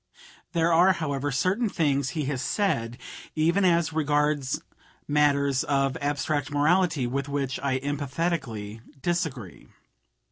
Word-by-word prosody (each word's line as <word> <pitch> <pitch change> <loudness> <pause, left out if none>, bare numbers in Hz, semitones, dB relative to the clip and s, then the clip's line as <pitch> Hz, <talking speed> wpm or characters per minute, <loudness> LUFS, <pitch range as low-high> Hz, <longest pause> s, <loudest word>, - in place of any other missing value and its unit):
There 170 0 +2
are, 180 +3 +6
however, 145 -5 -2
certain 190 - +1
things 140 -7 +1
he 150 - 0
has 135 -2 -2
said, 120 - -1 0.4
even 170 +5 +2
as 170 -3 +3
regards 150 -2 +1 0.5
matters 140 -2 +2
of 135 -2 +1
abstract 145 0 -1
morality, 155 0 +2
with 140 +3 -2
which 140 -2 -2
I 135 -2 0
emphatically 135 -6 -3 0.2
disagree. 160 - -3
145 Hz, 115 wpm, -26 LUFS, 135-165 Hz, 0.5 s, are